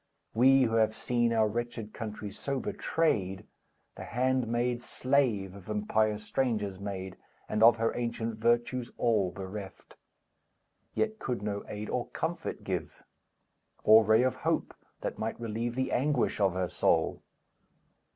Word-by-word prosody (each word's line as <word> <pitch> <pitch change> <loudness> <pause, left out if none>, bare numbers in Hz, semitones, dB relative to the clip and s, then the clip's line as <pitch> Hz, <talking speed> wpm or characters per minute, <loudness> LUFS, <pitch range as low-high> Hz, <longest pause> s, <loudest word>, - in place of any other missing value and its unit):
We, 130 +3 +6
who 115 -2 +1
have 110 -1 +3
seen 120 -1 +1
Our 110 -1 +3
wretched 115 -1 -4
country 105 -2 -6
so 135 +6 -3
betrayed, 100 - -1 0.5
The - - -8
handmaid, 125 -1 0
slave 120 -8 +1
of 100 0 -12
impious 105 0 +1
strangers 105 -6 -1
made, 95 -2 -5 0.3
And 105 - -1
of 115 0 +8
her 115 0 0
ancient 115 -2 -3
virtues 120 +2 +1
all 110 -6 +2
bereft; 95 +1 -8 1.0
Yet 220 0 0
could 120 -6 -3
no 100 -1 -2
aid 105 +1 -5
or 125 - -2
comfort 165 0 -4
give. 90 -5 -4 0.8
Or 110 +1 +8
ray 110 +3 +4
of 130 - 0
hope, - - -1 0.3
that - - -4
might 110 +1 -3
relieve 115 +1 -3
The 130 0 -1
anguish 140 -3 +1
of 95 -3 +3
her 95 -1 -1
soul. - - +1
115 Hz, 140 wpm, -30 LUFS, 105-125 Hz, 1.0 s, of